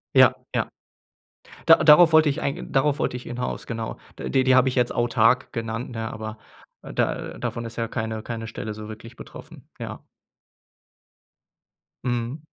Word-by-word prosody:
Ja, - - +7 0.2
ja. - - +1 1.0
Da - - +9
darauf 160 +2 +8
wollte 160 -1 +6
ich 145 +3 -2
eigen 140 - -3
darauf 145 +2 +2
wollte 125 - -1
ich 125 - -7
hinaus, 125 +1 -5
genau. 115 -1 -4 0.2
Die 130 -1 +1
die 130 0 +5
habe 130 0 +5
ich 130 - -2
jetzt 125 -2 +1
autark 120 +1 +2
genannt, 115 +1 -4
ne? 115 -1 -4
Aber 110 0 -7 0.4
da - - -2
davon 120 - -4
ist 115 0 -8
ja 115 -1 -2
keine 110 -2 -3
keine 115 -1 -5
Stelle 110 -1 -6
so 105 0 -8
wirklich 115 +2 -10
betroffen. - - -12
Ja. - - -7 2.0
Mhm. 120 +4 -2
120 Hz, 160 wpm, -24 LUFS, 115-130 Hz, 2.0 s, Da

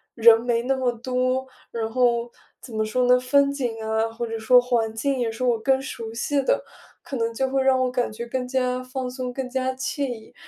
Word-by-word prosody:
人 230 -1 +7
没 235 -1 0
那 270 +2 +1
么 255 -2 +1
多。 255 +2 -1 0.2
然 225 -1 -3
后 240 -1 +1 0.3
怎 245 - -12
么 220 0 0
说 250 +4 0
呢？ 250 0 +5
风 280 +2 +3
景 240 -5 -3
啊， 220 +1 0
或 235 +1 -4
者 225 -1 -4
说 250 +3 +6
环 240 -3 0
境 275 +3 -1
也 230 -2 0
是 225 +3 -5
我 240 -3 +2
更 265 +3 +2
熟 230 -4 -6
悉 280 +5 0
的， - - +1 0.4
可 270 - -5
能 230 0 -1
就 265 +3 -1
会 270 0 +1
让 265 -1 +4
我 255 - +1
感 250 -1 0
觉 225 +2 -6
更 250 +1 -3
加 255 -1 0
放 255 0 -4
松、 250 -1 -5
更 260 0 -4
加 260 0 -1
惬 260 +2 -3
意。 230 -3 -8
250 Hz, 240 characters per minute, -24 LUFS, 230-260 Hz, 0.4 s, 人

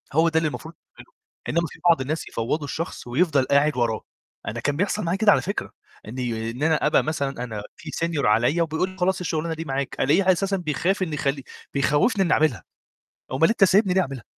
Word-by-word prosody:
هو 160 +3 +4
ده 160 - 0
اللي 160 -1 +2
المفروض 160 +2 -7 0.2
تعمله، - - -14 0.4
إنمّا 170 +1 +1
في - - -14
بعض 165 -5 +4
الناس 150 +4 -3
يفوضوا 135 +7 -2
الشخص 165 -1 -5
ويفضل 145 +2 +2
قاعد 140 +1 +2
وراه. 115 -3 0 0.5
أنا 115 - -3
كان 145 +4 -1
بيحصل 200 +3 0
معايا 175 +2 0
كده 210 0 +5
على - - +3
فكرة، 200 +3 -4 0.4
إني 115 -1 -3
إن 125 +5 -5
أنا 160 -1 +2
أبقى 150 - +3
مثلًا 140 -5 -2
أنا 110 -4 -5
في - - -9
senior 165 -4 -1
عليّا 120 +11 +3
وبيقول 160 +3 -1
لي: 185 - -13
"خلاص، 190 +1 +1
الشغلانة 165 -2 -2
دي 165 +1 -6
معاك" 135 -1 -3
ألاقيه 185 +8 +4
أساسا 195 +2 0
بيخاف 180 +3 0
إنه 160 -4 -4
يخلّي 140 -1 -1 0.3
بيخوفني 150 - +2
إني 175 - +2
أعملها، 130 - +1 0.7
أومال 140 +5 +3
أنت 225 -2 +3
سايبني 195 0 +4
ليه 190 - +4
أعملها؟ 135 - -5
155 Hz, 205 wpm, -24 LUFS, 135-180 Hz, 0.7 s, كده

